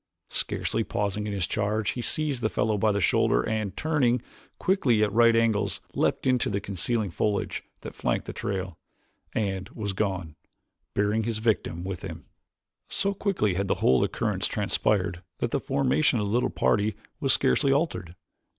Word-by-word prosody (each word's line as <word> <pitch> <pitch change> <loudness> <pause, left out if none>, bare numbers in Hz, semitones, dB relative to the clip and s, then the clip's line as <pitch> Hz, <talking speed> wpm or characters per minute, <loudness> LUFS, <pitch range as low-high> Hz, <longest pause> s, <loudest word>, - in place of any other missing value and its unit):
Scarcely 115 - -1
pausing 105 0 -2
in 105 - -3
his 95 -3 0
charge 105 +1 0
he 125 - -4
seized 145 0 0
the 110 - +1
fellow 110 0 +1
by 105 +1 +2
the 100 - 0
shoulder - - +2
and, 110 -3 -2
turning 140 -6 +2 0.4
quickly 130 - +2
at 105 - +1
right 115 0 +5
angles, 115 -2 +2
leaped - - 0
into 130 -2 +2
the 100 - 0
concealing 100 +2 -1
foliage 105 +3 -1 0.2
that - - -7
flanked - - -1
the - - -6
trail, 95 -4 -4 0.5
and 95 -3 -2
was 105 -3 -4
gone, 95 -6 -2 0.6
bearing 105 +2 +2
his 115 0 -1
victim 110 -6 0
with 95 -1 -4
him. - - -7 0.6
So 200 0 +1
quickly 195 - 0
had 95 +2 -1
the - - +2
whole 65 0 +3
occurrence - - -1
transpired 90 -4 0 0.2
that - - -2
the - - +1
formation 135 0 +2
of 105 - 0
the 100 - -2
little 120 - +2
party 105 -1 +1 0.2
was - - +2
scarcely 100 - +3
altered. 135 - -1
105 Hz, 170 wpm, -27 LUFS, 100-120 Hz, 0.6 s, right